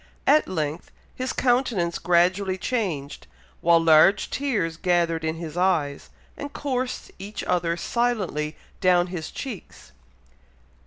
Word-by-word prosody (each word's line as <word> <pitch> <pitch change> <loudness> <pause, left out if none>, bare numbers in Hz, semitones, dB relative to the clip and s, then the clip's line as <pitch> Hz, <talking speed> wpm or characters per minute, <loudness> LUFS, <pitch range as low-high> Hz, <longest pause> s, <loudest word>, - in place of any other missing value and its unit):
At 300 +2 +4
length 155 -2 -3 0.2
his 255 0 -3
countenance 240 -9 +1
gradually 185 +2 +2
changed, 180 - -3 0.3
while 170 0 +5
large 165 +4 +5
tears 220 -13 -1
gathered 170 -2 +1
in 160 0 -1
his 165 -1 -7
eyes, 175 -6 0 0.3
and 285 0 -7
coursed 255 -3 -3
each 200 +2 -6
other 170 -1 0
silently 190 -10 -1 0.2
down 180 -1 +4
his 160 -3 -4
cheeks. 250 -9 -8
180 Hz, 115 wpm, -24 LUFS, 165-230 Hz, 0.3 s, while